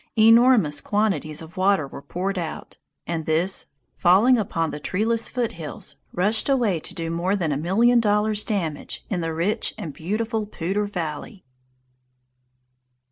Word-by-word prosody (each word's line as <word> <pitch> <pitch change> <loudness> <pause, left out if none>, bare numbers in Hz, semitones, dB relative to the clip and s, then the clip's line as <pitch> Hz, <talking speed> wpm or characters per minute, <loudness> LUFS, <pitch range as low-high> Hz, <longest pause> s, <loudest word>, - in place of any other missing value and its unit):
Enormous 225 - +5
quantities 175 -8 -1
of 160 +3 -14
water 190 -4 +2
were 140 - -10
poured 185 +5 -3
out, 165 -2 -6 0.3
and 165 -2 -4
this, 170 +5 +1 0.3
falling 195 +8 +5
upon 175 -7 -1
the 150 - -6
treeless 225 +8 -1
foothills, 170 - -5
rushed 210 +8 +2
away 235 -10 +2
to - - -8
do 165 -1 -4
more 175 +4 0
than 170 -6 -1
a - - 0
million 215 - +3
dollars' 210 -1 +2
damage 170 -9 -3
in 180 -3 -1
the 165 0 -2
rich 170 +6 -1
and 170 -9 -6
beautiful 215 - -2
Poudre 200 +2 -2
Valley. 180 +2 -6
190 Hz, 140 wpm, -23 LUFS, 165-215 Hz, 0.3 s, Enormous